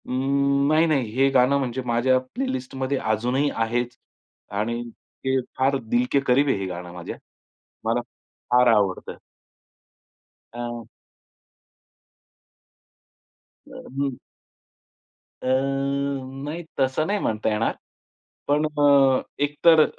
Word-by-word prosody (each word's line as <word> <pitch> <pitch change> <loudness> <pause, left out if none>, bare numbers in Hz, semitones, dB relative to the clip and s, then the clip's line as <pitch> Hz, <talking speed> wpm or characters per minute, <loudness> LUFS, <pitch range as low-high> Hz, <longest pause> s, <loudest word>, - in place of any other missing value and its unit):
अ, - - -13
नाही, 140 +4 +2
नाही. 135 -8 +1
हे 135 +1 +4
गाणं 130 +1 +4
म्हणजे 130 -1 -2
माझ्या 120 +2 +3
प्लेलिस्टमध्ये 130 - -3
अजूनही 125 +6 0
आहेच 120 +2 -1 0.6
आणि 115 +2 -1
ते 130 +3 -3 0.2
फार 135 +1 +2
दिल 120 +2 +3
के 140 - +4
करीब 135 +4 +4
आहे 135 - +2
हे 95 - -3
गाणं 90 -1 -6
माझ्या. 90 -1 -7 0.7
मला 115 +2 +1 0.5
फार 125 0 +5
आवडतं. 100 -3 -1 1.4
हं. 120 -1 -5 2.8
अ, - - -15 0.3
हं. 140 -2 -1 1.3
अ, - - -3
नाही 140 +3 -1 0.2
तसं 135 +3 +1
नाही 205 +1 0
म्हणता 110 - -1
येणार. 105 +1 0 0.7
पण 150 +2 +2
अ, 140 -3 +4 0.2
एक 145 0 -1
तर 160 -2 +8
130 Hz, 110 wpm, -24 LUFS, 120-140 Hz, 2.8 s, तर